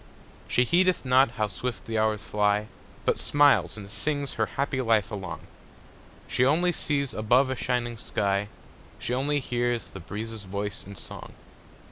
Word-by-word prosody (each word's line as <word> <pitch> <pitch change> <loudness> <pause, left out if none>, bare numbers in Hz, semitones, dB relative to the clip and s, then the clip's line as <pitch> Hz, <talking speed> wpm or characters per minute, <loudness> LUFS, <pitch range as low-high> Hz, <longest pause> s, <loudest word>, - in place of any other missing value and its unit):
She 125 - +3
heedeth 180 +1 +3
not 130 +1 +5
how 105 -1 +1
swift 115 +5 -5
the 110 -1 -1
hours 110 -1 +1
fly, 105 0 +1 0.4
But - - +2
smiles 130 - +4
and 100 -2 -8
sings 145 +3 -1
her 110 -1 0
happy 140 -1 0
life 115 -5 +2
along; 95 -5 -5 0.9
She 125 - +1
only 165 +7 +3
sees 140 -6 0
above 125 +5 +3
a - - -1
shining 120 -1 -1
sky; 100 -1 0 0.5
She 120 - -3
only 145 +3 +1
hears 120 -2 -1
the 95 - -9
breezes' 110 +4 -6
voice 100 +1 -4
in 100 - -9
song. - - -8
115 Hz, 155 wpm, -27 LUFS, 105-135 Hz, 0.9 s, not